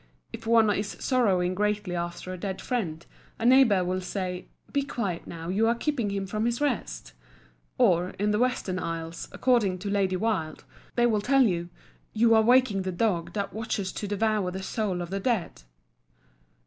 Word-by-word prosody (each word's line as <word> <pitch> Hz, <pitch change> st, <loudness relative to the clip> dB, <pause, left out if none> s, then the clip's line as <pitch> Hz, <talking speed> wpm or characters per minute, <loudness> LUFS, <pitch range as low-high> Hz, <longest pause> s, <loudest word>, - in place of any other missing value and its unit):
If 225 Hz, -, -8 dB
one 225 Hz, -1 st, +5 dB
is 205 Hz, 0 st, -2 dB
sorrowing 190 Hz, -9 st, +2 dB
greatly 205 Hz, -1 st, -1 dB
after 175 Hz, +1 st, -4 dB
a -, -, -6 dB
dead 190 Hz, 0 st, -4 dB
friend, 175 Hz, -11 st, -3 dB, 0.3 s
a 225 Hz, -, -3 dB
neighbour 240 Hz, -7 st, +6 dB
will 185 Hz, +1 st, -1 dB
say, 180 Hz, -1 st, -4 dB, 0.3 s
"Be 285 Hz, -, +2 dB
quiet 205 Hz, -11 st, -3 dB
now, 165 Hz, 0 st, -7 dB
you 210 Hz, +5 st, +2 dB
are 235 Hz, -, +3 dB
keeping 245 Hz, -4 st, -1 dB
him 200 Hz, -1 st, -2 dB
from 215 Hz, +3 st, -2 dB
his 235 Hz, 0 st, 0 dB
rest;" 195 Hz, -, -2 dB, 0.6 s
or, 175 Hz, +1 st, +3 dB
in 210 Hz, +1 st, +1 dB
the 210 Hz, -, +1 dB
Western 240 Hz, -7 st, 0 dB
Isles, 165 Hz, -1 st, -5 dB
according 235 Hz, -8 st, +2 dB
to 200 Hz, +2 st, -4 dB
Lady 195 Hz, -2 st, +1 dB
Wilde, 185 Hz, -6 st, -2 dB, 0.3 s
they 240 Hz, -, +3 dB
will 215 Hz, -3 st, +2 dB
tell 270 Hz, +4 st, +4 dB
you, 175 Hz, -6 st, 0 dB, 0.4 s
"You 230 Hz, +1 st, +4 dB
are 220 Hz, -, +6 dB
waking 240 Hz, -3 st, +4 dB
the 185 Hz, 0 st, -3 dB
dog 175 Hz, -3 st, -1 dB
that 200 Hz, -2 st, -3 dB
watches 215 Hz, -4 st, -3 dB
to 205 Hz, -, -5 dB
devour 210 Hz, -1 st, 0 dB
the 190 Hz, +1 st, -6 dB
souls 195 Hz, -4 st, -2 dB
of 175 Hz, 0 st, -6 dB
the 195 Hz, -, -1 dB
dead." 195 Hz, -, -1 dB
200 Hz, 180 wpm, -27 LUFS, 180-230 Hz, 0.6 s, neighbour